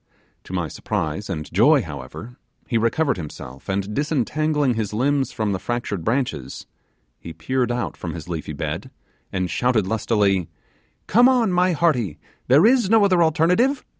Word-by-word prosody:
To - - -9
my 90 -3 -1
surprise 80 +6 -3
and 80 -5 -3
joy, 135 - +5
however, 75 - -9 0.3
he 120 - -3
recovered 140 +5 +1
himself, 70 -4 -9
and 100 +2 -2
disentangling 150 0 0
his 110 -3 -3
limbs 135 +4 +1
from 110 -4 -2
the 95 - -2
fractured 120 -7 -3
branches, 115 - -2 0.5
he 85 - -9
peered 125 +9 -1
out 120 - -2
from - - -6
his - - -8
leafy - - -5
bed, - - -4 0.4
and 95 -1 -1
shouted 120 -1 +1
lustily, 100 -4 +1 0.6
'Come 245 +5 +5
on, 245 -6 +2
my 180 0 +2
hearty 130 - +1 0.3
there 140 +9 +6
is 240 -4 +4
no 220 -2 +5
other 185 -3 +3
alternative! 180 - +2
120 Hz, 155 wpm, -22 LUFS, 95-155 Hz, 0.6 s, there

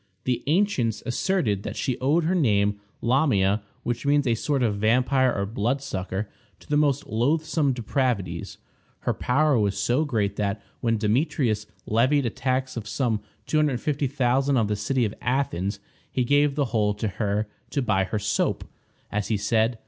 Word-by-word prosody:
The 125 -1 0
ancients 145 - +1
asserted 125 - 0
that - - -5
she 130 -4 -2
owed 150 +6 +2
her 170 +4 +1
name, 105 - +2 0.2
Lamia, 110 -6 +2 0.2
which 120 -1 -2
means 145 0 +3
a 120 - +3
sort 135 +3 0
of 105 -4 +1
vampire 125 +4 +3
or 100 -3 -1
bloodsucker, 105 -3 -2 0.3
to - - -19
the 150 - 0
most 145 -2 +2
loathsome 145 +5 +1
depravities. 115 -8 -2 0.4
Her - - 0
power 140 0 +2
was 100 -2 0
so 120 +8 +2
great 105 -8 -1
that, 100 +1 -1 0.2
when 115 -1 +1
Demetrius 110 -1 0 0.2
levied 130 +6 +2
a 115 - 0
tax 130 +2 -1
of 115 -3 -5
some 110 -2 0 0.2
$250,000 140 -2 +1
on 115 - +3
the 105 0 -1
city 120 +5 0
of 105 - -3
Athens, 120 -7 -1 0.3
he 125 - +1
gave 145 +2 +3
the 145 -2 +1
whole 105 -2 +2
to 105 +1 -2
her, 105 +1 -1 0.2
to 140 - -1
buy 95 -5 +2
her 100 +3 -2
soap, 105 0 0 0.5
as 105 -1 -1
he 110 - +1
said. 110 +3 +1
120 Hz, 165 wpm, -25 LUFS, 105-140 Hz, 0.5 s, means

